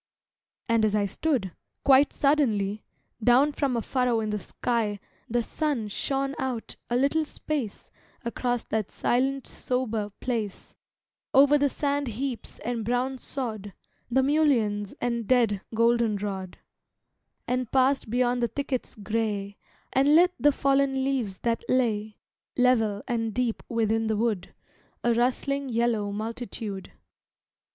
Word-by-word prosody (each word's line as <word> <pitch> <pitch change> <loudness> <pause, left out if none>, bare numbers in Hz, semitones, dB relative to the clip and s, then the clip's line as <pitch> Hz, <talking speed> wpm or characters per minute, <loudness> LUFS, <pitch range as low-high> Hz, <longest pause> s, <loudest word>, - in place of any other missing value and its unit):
And 230 -1 +3
as 215 -1 +2
I 205 -1 +2
stood, 220 - -1 0.3
quite 275 +1 +6
suddenly, 215 -9 +1 0.4
Down 255 +5 +5
from 275 -4 0
a 230 - -1
furrow 250 -3 +1
in 215 -1 -2
the 210 - -1
sky 215 +1 -1 0.3
The 240 +1 +1
sun 275 -6 -2
shone 275 +6 -1
out 250 -4 -3
a 240 - 0
little 280 +5 +2
space 290 -7 -4 0.3
Across 245 0 -1
that 215 -2 -1
silent 270 +2 0
sober 230 -5 -2
place, 225 -6 -3 0.6
Over 285 +2 +7
the 285 0 +3
sand 285 0 -1
heaps 245 +2 -4
and 235 -1 -2
brown 250 +3 -1
sod, 215 -8 -4 0.4
The 260 +2 +3
mulleins 240 -9 +2
and 235 -3 -1
dead 230 -6 +3
goldenrod, 210 -5 +1 0.9
And 250 -1 -1
passed 265 -2 +2
beyond 245 +1 +1
the 235 - +2
thickets 275 -1 -3
gray, 210 -1 -2 0.4
And 280 +3 +5
lit 355 +2 +6
the 290 - +5
fallen 275 -1 +2
leaves 250 -8 -1
that 230 -1 0
lay, 220 -4 +1 0.4
Level 225 -5 +3
and 225 -3 -1
deep 245 -3 0
within 225 -1 +1
the 220 -1 0
wood, 210 -5 -1 0.5
A 240 - +3
rustling 265 +3 0
yellow 230 -3 +1
multitude. 215 - -5
240 Hz, 130 wpm, -27 LUFS, 215-265 Hz, 0.9 s, Over